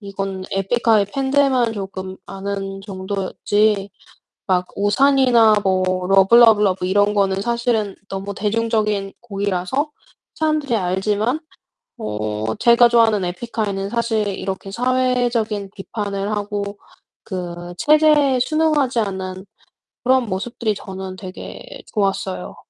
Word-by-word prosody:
이건 195 -2 -5
에픽하이 210 +2 +2
팬들만 265 -3 +2
조금 190 -1 -6
아는 195 0 -5
정도였지 200 +1 -1 0.6
막 180 -1 +1
우산이나 235 +1 +4
뭐 185 -1 +2 0.2
러브 195 +3 +5
러브 225 -3 +7
러브 190 -2 +1
이런 205 +2 +2
거는 195 -1 +1
사실은 235 -2 0
너무 195 +1 -5
대중적인 210 -2 0
곡이라서 200 - -2 0.4
사람들이 305 -5 0
알지만 205 - 0 0.6
어 105 - -3
제가 235 0 +5
좋아하는 225 -5 +3
에픽하이는 200 +1 -3
사실 225 -2 0
이렇게 195 0 -5
사회적인 240 -4 0
비판을 200 0 -4
하고 205 -1 -3 0.5
그 175 -2 -6
체제에 300 -3 +4
순응하지 295 -2 +1
않는 190 -2 -4 0.6
그런 260 0 +3
모습들이 215 +3 -2
저는 190 -1 -7
되게 185 -1 -9 0.3
좋았어요. 195 -3 -2
205 Hz, 270 characters per minute, -20 LUFS, 195-235 Hz, 0.6 s, 러브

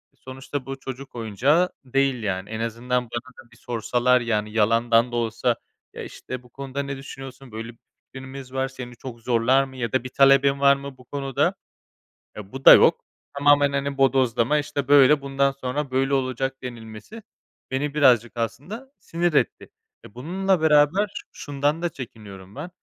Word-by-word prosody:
sonuçta, 130 +1 -7
bu 135 0 -6
çocuk 135 0 -8
oyuncağı 130 - +1 0.2
değil, 135 -2 0
yani. 95 -1 -3
En 110 0 -5
azından 120 +2 -1
bana 125 +2 -8
da 120 - -36
bir 115 - -19
sorsalar, 120 +2 +1
yani, 105 -2 -1
yalandan 115 +2 +3
da - - -4
olsa, 115 +1 0 0.4
ya, - - -7
işte: 125 -1 -8
"Bu 125 - -19
konuda 140 +2 -5
ne 140 -1 -5
düşünüyorsun? 135 -2 -10
Böyle 115 +1 -6
bir 115 - -24 0.4
fikrimiz 130 0 -9
var. 135 0 0
Seni 125 -2 -9
çok 120 -1 -9
zorlar 125 +3 +3
mı 135 -1 -10
ya 115 -3 -3
da 130 -1 0
bir 130 - -6
talebin 135 +1 +4
var 140 0 +6
mı 140 -1 -9
bu 125 - -17
konuda?" 135 -2 -1 0.8
Eee, 100 -2 -9
bu 135 0 -9
da - - +12
yok. - - +5 0.3
Tamamen, 145 0 +4
hani, 140 0 -2
bodoslama, 130 0 +2
işte: 145 -2 -3
"Böyle, 145 0 +6
bundan 140 0 +1
sonra 135 +1 -4
böyle 135 +1 +1
olacak." 135 0 -1
denilmesi 120 - -9 0.5
beni, 140 +2 -2
birazcık, 120 -5 +3
aslında, 145 - -5
sinir 170 0 -1
etti. - - 0 0.4
Eee, - - -14
bununla 185 +6 0
beraber 160 +7 +3
şundan 145 +3 -2
da 175 - 0
çekiniyorum 105 -7 -11
ben, 150 +5 -6
130 Hz, 170 wpm, -24 LUFS, 120-140 Hz, 0.8 s, da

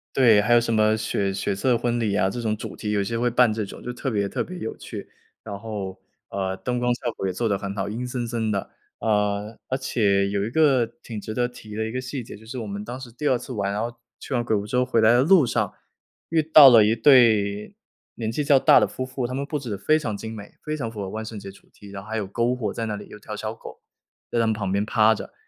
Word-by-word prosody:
对， 115 -6 +6
还 115 +3 +2
有 120 - +6
什 115 -1 -1
么 110 0 +3
血 100 -2 -1
血 100 - -1
色 120 +5 +1
婚 120 0 -1
礼 105 -4 0
啊， 95 -2 +2
这 110 - -5
种 110 -2 -1
主 110 - -7
题 105 - -4
有 100 -1 +1
些 115 +3 -2
会 120 +1 +2
办 120 -1 +4
这 110 -1 -2
种， - - -11
就 125 - -4
特 130 +2 -4
别 100 -3 -1
特 - - -2
别 185 - -8
有 110 - -4
趣。 - - -8 0.3
然 100 -2 -7
后， 100 -4 -6 0.3
呃， 95 -1 -2
灯 125 +5 -3
光 125 0 0
效 120 -1 -3
果 95 - -4
也 95 - -2
做 115 +4 -1
得 100 - +1
很 100 0 -5
好， 100 0 -2
阴 120 +4 -4
森 125 -1 -3
森 115 -1 -2
的。 100 -2 -2 0.3
呃， 105 0 0
而 130 - -1
且 100 -7 +1
有 100 0 -1
一 - - -3
个 135 -4 +4 0.2
挺 110 -3 -6
值 110 - -6
得 120 +1 0
提 110 -3 -11
的 110 - -1
一 110 - -4
个 130 - -3
细 130 0 -5
节， 110 - -10
就 110 - -17
是 120 +4 -7
我 110 - -5
们 100 0 -5
当 120 +3 -6
时 130 -2 -10
第 135 +6 -3
二 130 - +3
次 130 - -9
玩， 100 -4 -2
然 105 - -2
后 120 0 -4 0.2
去 - - -7
完 120 - +2
鬼 115 -2 0
屋 100 0 -1
之 125 - -2
后 125 - +3
回 120 -3 +2
来 110 +1 +6
的 120 +1 +5
路 165 +1 +5
上， - - -1 0.6
遇 160 -1 +3
到 155 -2 +9
了 115 -4 +7
一 110 +2 +2
对 110 - +4 0.4
年 110 -1 -3
纪 150 - -2
较 140 -1 +6
大 - - +6
的 - - +2
夫 130 - -5
妇。 130 -1 -3
他 125 - -6
们 140 +2 -2
布 150 0 -3
置 125 - -7
得 100 - -3
非 155 +10 +2
常 110 -9 -3
精 110 +2 -6
美， 105 -2 -10
非 155 0 -3
常 120 -6 -3
符 110 -2 -7
合 95 - -4
万 110 +2 -5
圣 110 -1 -7
节 100 -1 -8
主 100 - -20
题， 100 - -14
然 100 -1 -7
后 100 - -14
还 110 - -3
有 105 - -1
篝 115 +5 0
火 110 -5 -3
在 115 - -3
那 105 -1 -3
里， 105 - -10
有 105 - -11
条 105 - -7
小 110 +1 -4
狗 - - -12 0.5
在 120 - +1
他 115 - +3
们 110 - +2
旁 105 -3 -3
边 100 +2 +1
趴 110 0 +4
着。 110 - -8
110 Hz, 310 characters per minute, -24 LUFS, 105-125 Hz, 0.6 s, 到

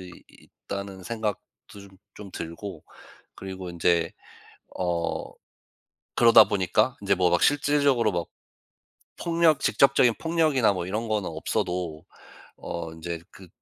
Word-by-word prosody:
있 90 -1 -10 0.5
있다는 100 -1 -6
생각도 110 -1 -3 0.4
좀 100 - -13 0.3
좀 100 -2 -10
들고 85 +1 -7 0.5
그리고 95 -1 -7
인제 85 -1 +1 0.6
어 85 -2 -2 0.9
그러다 115 -2 +8
보니까 100 +5 +1
인제 100 -1 +2
뭐 90 -2 +2
막 85 - +2
실질적으로 140 -6 +3
막 85 -1 -2 0.9
폭력 165 -3 +2
직접적인 135 -4 +4
폭력이나 155 -9 +2
뭐 90 -2 -4
이런 110 +5 -3
거는 105 -3 -1
없어도 80 0 -3 0.5
어 85 -1 -6
인제 85 0 -6
그 95 -2 -14
100 Hz, 240 characters per minute, -26 LUFS, 85-115 Hz, 0.9 s, 그러다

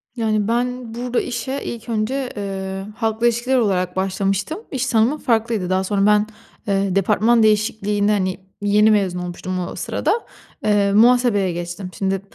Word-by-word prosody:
Yani, 215 -3 0
ben 245 0 -2
burada 245 +1 -1
işe 255 +4 -4
ilk 235 0 -7
önce, 245 +4 -1
ııı, 195 0 -4
halkla 225 0 +1
ilişkiler 240 +3 +1
olarak 185 -6 0
başlamıştım. 195 - -1
İş 265 -3 -1
tanımım 230 +6 +2
farklıydı. 225 -7 0
Daha 185 0 +1
sonra 195 +1 +1
ben, 210 0 +4 0.4
eee, 195 -1 0
departman 215 +4 +3
değişikliğini, 210 -1 +1
hani, 185 -3 0 0.2
yeni 210 +1 +4
mezun 190 -4 +1
olmuştum 180 +1 -4
o - - -7
sırada. 470 - -1 0.4
Eee, 205 -1 +2
muhasebeye 225 -3 +4
geçtim. 175 +2 -5
Şimdi 195 -1 -1
210 Hz, 145 wpm, -20 LUFS, 195-235 Hz, 0.4 s, ben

